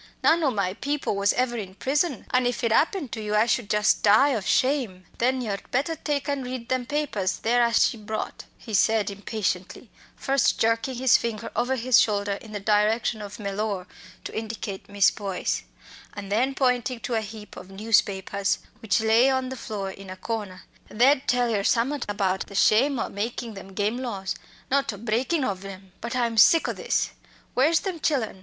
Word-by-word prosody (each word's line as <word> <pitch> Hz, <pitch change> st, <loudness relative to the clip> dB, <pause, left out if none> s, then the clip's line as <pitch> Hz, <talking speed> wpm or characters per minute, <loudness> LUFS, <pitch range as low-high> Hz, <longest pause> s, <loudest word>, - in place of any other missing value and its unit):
None 330 Hz, +1 st, +4 dB
o' 285 Hz, -, +4 dB
my 200 Hz, -6 st, -1 dB
people 285 Hz, 0 st, -2 dB
was 200 Hz, +1 st, +3 dB
ever 250 Hz, -1 st, 0 dB
in 190 Hz, -4 st, -6 dB
prison 280 Hz, -, 0 dB
an' 250 Hz, -1 st, +3 dB
if 245 Hz, 0 st, -2 dB
it 230 Hz, -, +2 dB
'appened 305 Hz, -, +1 dB
to 220 Hz, -, -4 dB
you 210 Hz, 0 st, -2 dB
I 215 Hz, +2 st, +4 dB
should 230 Hz, -2 st, 0 dB
just 210 Hz, 0 st, +2 dB
die 215 Hz, +8 st, +5 dB
of 220 Hz, -8 st, -2 dB
shame!" 250 Hz, -9 st, +1 dB
"Then 255 Hz, +2 st, +1 dB
yer'd 205 Hz, -4 st, -4 dB
better 285 Hz, +6 st, 0 dB
take 290 Hz, -2 st, -2 dB
and 280 Hz, -2 st, -1 dB
read 250 Hz, -1 st, -6 dB
them 255 Hz, -2 st, -1 dB
papers 260 Hz, -11 st, -1 dB
there 240 Hz, +2 st, +2 dB
as 235 Hz, -1 st, +4 dB
she 235 Hz, -, -1 dB
brought," 215 Hz, 0 st, -5 dB
he 225 Hz, -, -10 dB
said 210 Hz, +1 st, +3 dB
impatiently, 200 Hz, -2 st, -4 dB, 0.2 s
first 275 Hz, -2 st, +1 dB
jerking 230 Hz, +3 st, +1 dB
his 250 Hz, 0 st, +5 dB
finger 230 Hz, -3 st, -4 dB
over 245 Hz, +3 st, +1 dB
his 250 Hz, -1 st, +4 dB
shoulder 205 Hz, -1 st, 0 dB
in 210 Hz, +2 st, -6 dB
the 205 Hz, -, -4 dB
direction 215 Hz, +2 st, +1 dB
of 205 Hz, +1 st, -8 dB
Mellor 200 Hz, -2 st, -3 dB, 0.4 s
to -, -, -7 dB
indicate 220 Hz, -3 st, -5 dB
Miss 200 Hz, -1 st, +4 dB
Boyce, 195 Hz, -3 st, -2 dB, 0.5 s
and 200 Hz, -1 st, -7 dB
then 255 Hz, +6 st, +1 dB
pointing 250 Hz, -2 st, +1 dB
to 245 Hz, -, -4 dB
a 225 Hz, -, +1 dB
heap 215 Hz, 0 st, -9 dB
of 185 Hz, -, -10 dB
newspapers 200 Hz, -1 st, +1 dB, 0.2 s
which 225 Hz, 0 st, +1 dB
lay 225 Hz, +4 st, +4 dB
on 260 Hz, -1 st, 0 dB
the 260 Hz, -, -5 dB
floor 205 Hz, -5 st, -5 dB
in 195 Hz, 0 st, -11 dB
a 185 Hz, -, -7 dB
corner, 205 Hz, -3 st, -5 dB, 0.3 s
"they'd 260 Hz, +5 st, +3 dB
tell 245 Hz, 0 st, +2 dB
yer 205 Hz, -3 st, +1 dB
summat 245 Hz, +6 st, +1 dB
about 190 Hz, -2 st, -1 dB
the 200 Hz, -, -11 dB
shame 255 Hz, +8 st, +4 dB
o' -, -, -1 dB
makin' 230 Hz, +2 st, -4 dB
them 195 Hz, -1 st, -10 dB
game 210 Hz, +4 st, 0 dB
laws 205 Hz, -7 st, -3 dB, 0.4 s
not 275 Hz, -1 st, +2 dB
o' 205 Hz, -, -8 dB
breakin' 240 Hz, -, 0 dB
ov 195 Hz, -5 st, -2 dB
'em. 190 Hz, -1 st, -10 dB
But 235 Hz, +2 st, -4 dB
I'm 235 Hz, -3 st, +1 dB
sick 330 Hz, +9 st, +6 dB
o' -, -, -1 dB
this! -, -, -1 dB, 0.4 s
Where's 310 Hz, +6 st, +3 dB
them 370 Hz, -4 st, -4 dB
chillen? 255 Hz, -11 st, -1 dB
225 Hz, 195 wpm, -25 LUFS, 205-255 Hz, 0.5 s, sick